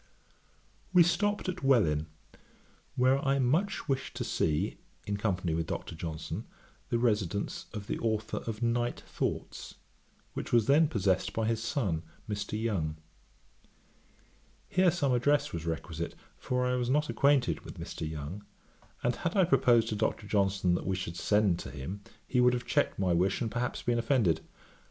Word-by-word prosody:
We 180 Hz, -2 st, +8 dB
stopped 205 Hz, +5 st, +1 dB
at 185 Hz, -, -3 dB
Welwyn, 85 Hz, -, +3 dB, 0.9 s
where 130 Hz, +2 st, +3 dB
I 135 Hz, 0 st, +2 dB
wished 155 Hz, +12 st, +1 dB
much 135 Hz, -2 st, -1 dB
to -, -, -2 dB
see, 75 Hz, -2 st, 0 dB, 0.3 s
in 100 Hz, 0 st, -2 dB
company 95 Hz, -5 st, -1 dB
with 80 Hz, 0 st, -1 dB
Dr. -, -, -4 dB
Johnson, 80 Hz, -1 st, -5 dB, 0.4 s
the 120 Hz, -, +2 dB
residence 105 Hz, -4 st, 0 dB
of 105 Hz, -3 st, -6 dB
the -, -, -3 dB
authour 110 Hz, -1 st, -1 dB
of 115 Hz, +1 st, -3 dB
Night 120 Hz, +1 st, 0 dB
Thoughts, -, -, -4 dB, 0.6 s
which -, -, -5 dB
was 115 Hz, -3 st, +4 dB
then 150 Hz, +4 st, +5 dB
possessed 100 Hz, -, +1 dB
by 110 Hz, -, 0 dB
his 110 Hz, 0 st, 0 dB
son, 115 Hz, -, -1 dB, 0.3 s
Mr. 105 Hz, 0 st, -3 dB
Young. 85 Hz, -9 st, -1 dB, 1.7 s
Here 185 Hz, 0 st, +4 dB
some 150 Hz, -6 st, +1 dB
address 145 Hz, +4 st, +2 dB
was 85 Hz, -1 st, -4 dB
requisite, 80 Hz, 0 st, -4 dB, 0.2 s
for 125 Hz, 0 st, -1 dB
I 125 Hz, -, +1 dB
was 125 Hz, -1 st, -1 dB
not 150 Hz, +3 st, +2 dB
acquainted 140 Hz, -4 st, +3 dB
with -, -, -10 dB
Mr. 80 Hz, -, -5 dB
Young, 80 Hz, +6 st, -6 dB, 0.6 s
and 120 Hz, -, +1 dB
had 170 Hz, +1 st, -2 dB
I 190 Hz, -, +6 dB
proposed 120 Hz, -9 st, +4 dB
to 110 Hz, -, -1 dB
Dr. 105 Hz, 0 st, -1 dB
Johnson 95 Hz, -3 st, +2 dB
that 90 Hz, -, -2 dB
we 95 Hz, -, +1 dB
should 90 Hz, -3 st, -4 dB
send 100 Hz, -1 st, +2 dB
to -, -, -6 dB
him, 75 Hz, +9 st, -6 dB, 0.3 s
he 125 Hz, -, +2 dB
would 125 Hz, 0 st, +5 dB
have 125 Hz, -1 st, -2 dB
checked -, -, +1 dB
my 95 Hz, -2 st, +2 dB
wish, 90 Hz, +4 st, +2 dB
and 115 Hz, -3 st, -2 dB
perhaps 120 Hz, 0 st, -2 dB
been 120 Hz, -1 st, +1 dB
offended. 110 Hz, -, +2 dB
110 Hz, 165 wpm, -30 LUFS, 90-125 Hz, 1.7 s, We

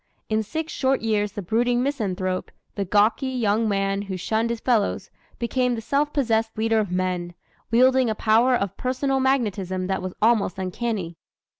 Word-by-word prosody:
In 220 Hz, 0 st, +1 dB
six 315 Hz, +9 st, -4 dB
short 265 Hz, 0 st, +1 dB
years 210 Hz, -2 st, 0 dB
the 205 Hz, -, -5 dB
brooding 240 Hz, +5 st, +1 dB
misanthrope, 190 Hz, -9 st, -2 dB, 0.2 s
the 200 Hz, -, -2 dB
gawky 210 Hz, +7 st, +2 dB
young 225 Hz, -3 st, +1 dB
man 195 Hz, 0 st, 0 dB
who 195 Hz, -2 st, -5 dB
shunned 220 Hz, +5 st, 0 dB
his 235 Hz, -1 st, -2 dB
fellows, 225 Hz, -4 st, 0 dB, 0.3 s
became 250 Hz, +1 st, 0 dB
the -, -, -4 dB
self 285 Hz, +5 st, 0 dB
possessed 225 Hz, -6 st, 0 dB
leader 225 Hz, 0 st, +2 dB
of 210 Hz, -3 st, -1 dB
men, 180 Hz, -1 st, -2 dB, 0.3 s
wielding 255 Hz, +1 st, +4 dB
a 220 Hz, -, -1 dB
power 230 Hz, +4 st, +3 dB
of 200 Hz, -5 st, -2 dB
personal 265 Hz, +1 st, 0 dB
magnetism 205 Hz, -9 st, 0 dB
that 190 Hz, +1 st, -1 dB
was 185 Hz, 0 st, -5 dB
almost 220 Hz, -4 st, +2 dB
uncanny. 190 Hz, -2 st, -3 dB
220 Hz, 165 wpm, -24 LUFS, 195-250 Hz, 0.3 s, wielding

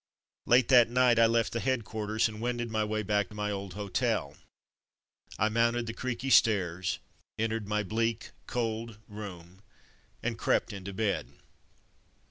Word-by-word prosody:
Late 120 Hz, 0 st, +5 dB
that 120 Hz, -3 st, +7 dB
night 125 Hz, -1 st, +4 dB
I 115 Hz, -, +7 dB
left 115 Hz, 0 st, +1 dB
the 115 Hz, -, -1 dB
head 130 Hz, -2 st, 0 dB
quarters 110 Hz, 0 st, 0 dB
and 110 Hz, -1 st, -8 dB
wended 120 Hz, -1 st, -2 dB
my 110 Hz, -1 st, +1 dB
way 110 Hz, 0 st, -1 dB
back 105 Hz, 0 st, 0 dB
to 105 Hz, -, -12 dB
my 105 Hz, 0 st, -2 dB
old 100 Hz, -2 st, -5 dB
hotel. 100 Hz, -, -1 dB, 1.0 s
I 105 Hz, -, +3 dB
mounted 115 Hz, +1 st, +1 dB
the 115 Hz, -, -4 dB
creaky 130 Hz, +2 st, -3 dB
stairs, 95 Hz, -7 st, +3 dB, 0.4 s
en 110 Hz, 0 st, 0 dB
tered 110 Hz, -2 st, -3 dB
my 105 Hz, 0 st, 0 dB
bleak, 115 Hz, +3 st, -1 dB, 0.2 s
cold 115 Hz, -2 st, -3 dB
room, 95 Hz, -3 st, -9 dB, 0.6 s
and -, -, -2 dB
crept -, -, +1 dB
into 100 Hz, 0 st, -6 dB
bed. 100 Hz, 0 st, -1 dB
110 Hz, 155 wpm, -30 LUFS, 105-115 Hz, 1.0 s, that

